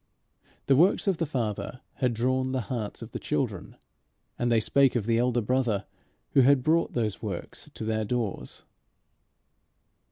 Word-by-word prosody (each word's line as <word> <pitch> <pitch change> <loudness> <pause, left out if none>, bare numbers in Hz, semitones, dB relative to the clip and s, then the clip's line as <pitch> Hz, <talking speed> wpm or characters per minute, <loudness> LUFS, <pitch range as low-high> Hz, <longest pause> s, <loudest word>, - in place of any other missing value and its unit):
The 135 - +4
works 175 +8 +4
of 195 -4 +1
the 165 - -1
Father 125 -2 -3 0.2
had 125 -3 +1
drawn 130 +3 0
the 130 - 0
hearts 110 -4 -4
of - - -10
the - - -5
children, - - -3 0.6
and 120 0 +1
they 115 - +4
spake 135 +4 +3
of 115 -4 0
the 115 0 +2
Elder 125 0 +2
Brother 115 -3 0 0.5
who 135 - +5
had 130 0 +4
brought 165 +3 +2
those 110 -4 -1
works - - -6
to - - -5
their 110 0 0
doors. 115 -2 -3
125 Hz, 160 wpm, -27 LUFS, 110-130 Hz, 0.6 s, who